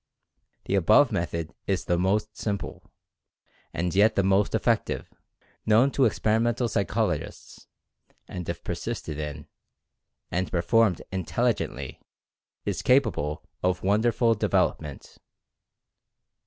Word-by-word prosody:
The - - -2
above 105 +8 +5
method 85 -1 -3
is 95 -3 0
the 90 - +1
most 105 +3 0
simple, 100 -2 -5 0.8
and 85 +1 -2
yet 105 +3 +4
the 100 - +2
most 95 +1 +2
effective, - - 0 0.5
known 115 +6 +4
to 135 - +3
experimental 115 +2 +1
psychologists, 100 -5 -2 0.6
and 90 -2 -6
if - - -4
persisted 75 -2 -4
in, 75 -1 -5 0.9
and 90 +2 -1
performed 95 +1 +2
intelligently, 95 - -2 0.6
is - - -2
capable 75 - +1 0.2
of 90 0 0
wonderful 115 +4 +3
development. 75 -8 -1
100 Hz, 100 wpm, -26 LUFS, 85-115 Hz, 0.9 s, above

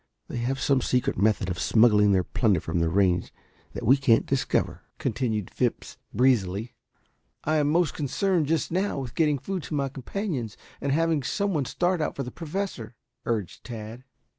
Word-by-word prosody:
They - - -4
have 130 +3 -1
some 135 -2 +2
secret 125 0 +1
method 100 0 +2
of 90 -1 -3
smuggling 105 -3 +5
their 95 -2 +3
plunder 100 -2 +1
from 80 +2 -2
the 85 -1 +2
range 90 -1 +2 0.4
that - - -5
we 130 +6 +6
can't 120 -4 +3
discover," 135 -1 0 0.2
continued 110 -7 -2
Phipps - - -2
breezily. 110 -3 +1 0.7
"I 155 +1 +1
am 145 -1 +2
most 165 0 +2
concerned 165 +3 0
just 160 0 0
now 190 +1 0
with 130 -4 -5
getting 150 -3 +2
food 185 +7 -4
to 155 - -5
my 140 -1 0
companions 135 - -4 0.2
and 140 - 0
having 160 0 +2
some 200 +9 -1
one 145 -4 0
start 175 +5 0
out 150 - -1
for 140 - -3
the 125 - -7
Professor," 160 - -5 0.3
urged 110 -6 -2
Tad. 115 +1 -8
130 Hz, 175 wpm, -26 LUFS, 110-155 Hz, 0.7 s, we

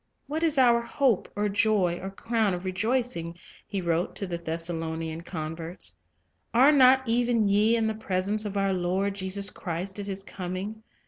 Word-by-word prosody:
Life's - - -48
"What 310 +4 -3
is 320 -3 +2
our 240 -2 +5
hope, 235 -2 +1
or 205 0 +1
joy, 200 -4 +2
or 190 - -4
crown 215 0 0
of 180 +1 -7
rejoicing?" 185 -3 -1 0.3
he 200 - -3
ttnpense 180 - -6
wrote 170 +1 0
to 200 - -3
the 175 -2 -4
Thessalonian 165 -1 -3
converts. 165 0 -5 0.6
"Are 265 +5 +7
not 260 -2 +6
even 235 -2 +2
ye 210 +3 +4
in 225 -1 +1
the 220 - 0
presence 205 0 -1
of 205 -1 -4
our 195 -1 +2
Lord 185 +2 0
Jesus 195 0 -1
Christ 185 +3 -5
at 200 - -3
His 195 0 -3
coming? 190 +4 -5
195 Hz, 180 wpm, -27 LUFS, 175-225 Hz, 0.6 s, Are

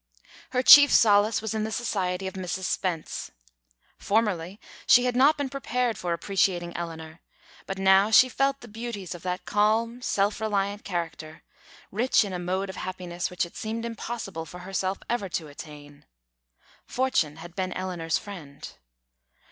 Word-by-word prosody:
Her 255 0 0
chief 285 +2 +10
solace 210 0 +4
was 220 - -3
in 215 -1 -1
the 220 - -3
society 190 -5 -2
of 190 - -4
Mrs. 185 0 -4
Spence. 175 -3 -3 0.7
Formerly 200 -3 0 0.3
she 245 0 +6
had 250 -1 0
not 285 +5 +5
been 285 -1 -2
prepared 250 -3 -1
for 175 - -4
appreciating 175 0 0
Eleanor, 165 -1 -7 0.5
but 195 - -4
now 190 +2 +5
she 250 +3 +7
felt 275 +1 0
the 240 - -11
beauties 220 -4 -6
of 175 - -10
that 180 0 -4
calm, 225 +3 +1
self 205 -2 0
reliant 205 -1 -1
character, 165 -4 -5 0.5
rich 230 +2 +2
in 195 - -6
a 180 - -3
mode 185 +2 -2
of - - -12
happiness 180 -2 -4
which 180 -1 -1
it 170 - -14
seemed 225 +1 -4
impossible 225 -7 -5
for 180 +4 -10
herself 190 +1 -2
ever 220 -5 -2
to 165 -3 -3
attain. 145 0 -12 0.8
Fortune 250 - 0
had 170 +2 -11
been 185 -1 -2
Eleanor's 175 -3 -2
friend. 160 -9 -9
195 Hz, 155 wpm, -26 LUFS, 175-225 Hz, 0.8 s, chief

